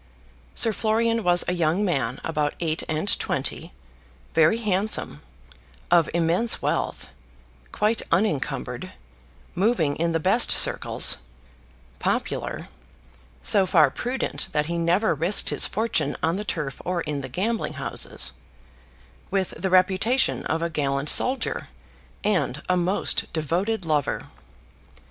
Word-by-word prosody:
Sir 225 - +4
Florian 230 +1 +1
was 175 -1 +3
a 180 - +1
young 175 +3 +1
man 135 - -1
about 150 -2 -1
eight 160 -2 -1
and 160 +4 -1
twenty, - - -3 0.6
very 160 +7 +4
handsome, 210 -1 -1 0.7
of 170 -2 +4
immense 170 +7 +1
wealth, - - -2 0.6
quite 215 +2 +1
unencumbered, 165 -5 -1 0.6
moving 175 -7 +1
in 170 +1 0
the 165 - 0
best - - +3
circles, - - +2 0.8
popular, - - -2 0.8
so 195 -2 +5
far 155 -6 +4
prudent 250 - -3
that 150 0 +1
he 170 +2 -2
never 175 +5 +2
risked 170 +7 +1
his - - +3
fortune 225 +3 -1
on 165 +2 +1
the 205 - -3
turf 150 -8 -4
or 180 -1 -1
in 150 -3 -3
gambling 190 - -2
houses, - - 0 1.0
with 190 -1 -1
the 190 - -2
reputation 190 +8 +2
of 165 +1 -1
a 170 - -1
gallant 140 -1 0
soldier, 260 +1 +2 0.6
and 160 -9 0
a 180 - +2
most 180 +3 0
devoted 175 +6 -1
lover. 150 -3 0
175 Hz, 120 wpm, -24 LUFS, 155-210 Hz, 1.0 s, so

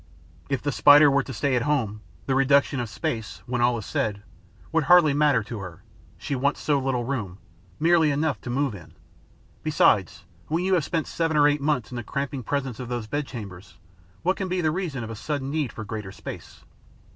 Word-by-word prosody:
If 135 -3 -1
the 145 - 0
Spider 145 +1 +7
were 140 +1 +3
to 135 - -8
stay 130 +3 0
alone, 125 -5 0 0.3
the 135 - 0
reduction 135 0 +3
of 120 -2 -3
space, 110 +1 -4
when 120 0 -2
all 120 0 +3
is 110 - -6
said, 105 -2 -2 0.5
would 165 -2 +1
hardly 175 -3 +6
matter 145 -5 +3
to 110 +1 -7
her: 90 -4 -9 0.3
she 140 - -3
wants 140 +3 0
so 145 -2 +1
little 130 -2 -1
room, 115 -8 -4 0.4
merely 165 -1 +4
enough 145 0 0
to - - -7
move 135 0 0
in! 90 -5 -12 0.7
Besides, - - +2 0.2
when 165 +3 0
you 190 - +2
have 175 -4 +3
spent 165 -2 -1
seven 165 -2 -1
or 145 0 +6
eight 145 0 +1
months 140 -6 0
in 125 - -5
the 120 - -4
cramping 140 +3 -3
presence 130 -1 -3
of 125 -2 -6
those 120 -3 -3
bedchambers, 105 - -6 0.5
what 185 +2 +1
can 190 - -2
be 185 0 -1
the 160 -3 +1
reason 155 -8 -3
of 115 - -6
a - - -6
sudden 140 +3 -3
need 150 -6 -1
for 110 - -7
greater 105 -2 -6
space? - - -10
135 Hz, 205 wpm, -25 LUFS, 115-150 Hz, 0.7 s, Spider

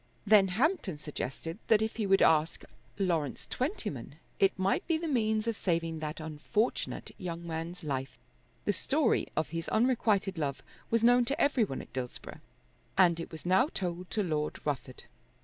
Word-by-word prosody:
Then 205 -2 +6
Hampton 225 - 0
suggested 150 - -5
that 220 - +5
if 220 - -3
he 215 -3 0
would 195 0 +5
ask 160 0 +3 0.3
Lawrence 170 -8 -1
Twentyman 215 - -3 0.2
it 195 0 +3
might 190 +1 +1
be 325 -1 +2
the 330 +1 -3
means 220 -6 +1
of 230 -1 0
saving 165 -4 -1
that 155 +1 -4
unfortunate 160 +9 -2
young 170 -1 -5
man's 165 +2 -5
life. 135 -3 -3 0.5
The - - +2
story - - +1
of 160 - +1
his 165 +1 -4
unrequited 220 -6 +2
love 140 -3 -2 0.3
was 230 0 +2
known 245 +1 +6
to 275 +4 -1
every 280 -4 +3
one 135 - -5
at - - -18
Dillsborough 125 -1 -6 0.6
and 170 -3 +5
it 165 - -6
was 160 0 -9
now 190 +10 +4
told 180 - -4
to 215 - 0
Lord 155 -4 -2
Rufford. 135 -3 -3
180 Hz, 165 wpm, -31 LUFS, 155-220 Hz, 0.6 s, Then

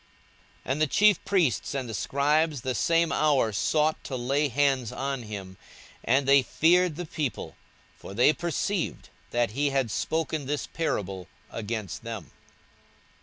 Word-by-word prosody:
42:020:019 - - -2
And 145 +3 -1
the 155 - +4
chief 205 +6 +4
priests 170 - +1
and 130 -3 -2
the 115 - -6
scribes 145 +4 +1
the 130 +1 -2
same 165 +6 +2
hour 145 -7 +2
sought 155 +8 +1
to 135 - -4
lay 135 +4 +1
hands 135 -2 +1
on 135 -1 -3
him; 100 -4 -8 0.5
and 135 +1 +2
they 140 0 +7
feared 175 +5 +3
the 175 +2 -5
people: 145 -7 -4 0.4
for 100 - -9
they 125 +7 +5
perceived 175 +3 -2 0.2
that 120 -2 0
he 140 +5 0
had 135 -5 0
spoken 160 +2 -2
this 145 +1 -2
parable 95 - -3 0.2
against 110 -4 -5
them. 110 - -7
140 Hz, 150 wpm, -27 LUFS, 115-155 Hz, 0.5 s, they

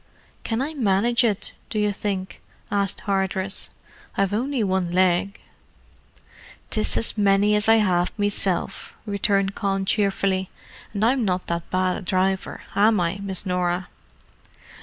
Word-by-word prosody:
"Can 230 +3 -1
I 305 +3 -4
manage 235 -2 +2
it, 210 -4 0 0.2
do - - -4
you 210 -1 +1
think?" 195 -2 -4 0.3
asked 200 -2 0
Hardress. 195 -1 -1 0.5
"I've 195 0 +1
only 250 +2 0
one 190 -3 0
leg." 185 +2 +2 1.3
"'Tis 215 -2 +1
as 225 - -1
many 200 +1 +4
as 210 +1 +2
I 225 - +8
have 180 -5 +2
meself," 200 -2 -1
returned 200 -1 +1
Con 195 -1 -1
cheerfully. 195 -2 +1 0.5
"And 205 +2 +2
I'm 250 +1 +2
not 180 -3 0
that 170 0 -3
bad 185 0 +1
a - - -6
driver, 190 +1 -1
am 210 0 +4
I, 175 +3 -1
Miss 195 -1 -1
Norah?" 180 0 -1
195 Hz, 140 wpm, -23 LUFS, 185-210 Hz, 1.3 s, I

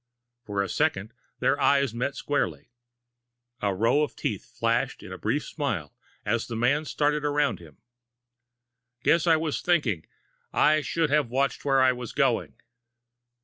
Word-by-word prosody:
For 100 -1 0
a - - -3
second, 115 -8 -1 0.2
their 145 - +1
eyes 140 -4 +3
met 125 +4 -2
squarely. 90 - -2 0.9
A 100 - +1
row 115 +9 +3
of 150 - -2
teeth 105 +3 -4
flashed 115 +2 0
in - - -10
a - - -7
brief 130 +8 0
smile 110 - -3 0.3
as 120 - 0
the 115 - -5
man 135 +7 +1
started 150 0 0
around 145 -8 +1
him. 80 -4 -15 1.3
"Guess 170 0 +3
I 165 - +6
was 155 -2 -2
thinking. 135 - +1 0.7
Should 160 +2 -1
have 145 -4 +2
watched 135 +3 0
where 135 -1 +4
I 130 - +5
was 125 -1 -6
going." 135 -5 +1
130 Hz, 145 wpm, -26 LUFS, 110-145 Hz, 1.3 s, I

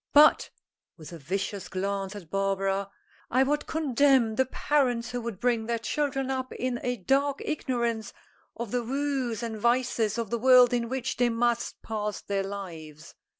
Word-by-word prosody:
But," 300 +1 +6 0.5
with 155 -1 -11
a 165 - -8
vicious 190 +5 -3
glance 195 +2 -3
at 175 -6 -10
Barbara, 195 0 0 0.4
"I 255 +2 +4
would 295 +2 -1
condemn 270 -6 +3
the 260 +4 +1
parents 250 -5 0
who 245 0 -3
would 230 -5 -5
bring 235 -2 +1
their 235 0 0
children 270 +2 -1
up 260 -1 -3
in 250 -1 -2
a 245 0 -1
dark 275 +7 +1
ignorance 235 -7 -2 0.4
of 235 -3 -5
the 245 - 0
woes 260 -2 -2
and 220 -2 -4
vices 235 -2 +1
of 230 -3 -3
the 235 - 0
world 250 0 +7
in 235 -1 0
which 260 -1 -3
they 245 -1 +3
must 235 0 -1
pass 210 -1 -3
their 200 -1 -2
lives. 170 -6 -8
235 Hz, 165 wpm, -27 LUFS, 200-260 Hz, 0.5 s, world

